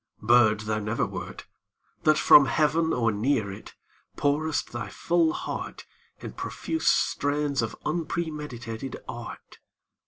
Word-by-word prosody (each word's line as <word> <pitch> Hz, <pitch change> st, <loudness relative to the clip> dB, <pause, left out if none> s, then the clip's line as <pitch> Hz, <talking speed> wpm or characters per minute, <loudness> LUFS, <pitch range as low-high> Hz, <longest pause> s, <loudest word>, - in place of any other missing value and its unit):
Bird 110 Hz, -2 st, +4 dB
thou 110 Hz, 0 st, -2 dB
never 110 Hz, +2 st, -1 dB
wert -, -, -7 dB, 0.6 s
That 155 Hz, 0 st, +5 dB
from 140 Hz, -2 st, +7 dB
heaven 160 Hz, +2 st, +2 dB
or 115 Hz, -2 st, +1 dB
near 110 Hz, -1 st, 0 dB
it 95 Hz, -, -11 dB, 0.4 s
Pourest 150 Hz, +2 st, 0 dB
thy 120 Hz, -1 st, -5 dB
full 170 Hz, -2 st, +1 dB
heart -, -, -6 dB, 0.4 s
In -, -, -7 dB
profuse 320 Hz, 0 st, -4 dB
strains 145 Hz, -1 st, +1 dB
of 115 Hz, -, -3 dB
unpremeditated 150 Hz, -7 st, -4 dB
art. -, -, -9 dB
140 Hz, 120 wpm, -26 LUFS, 115-155 Hz, 0.6 s, from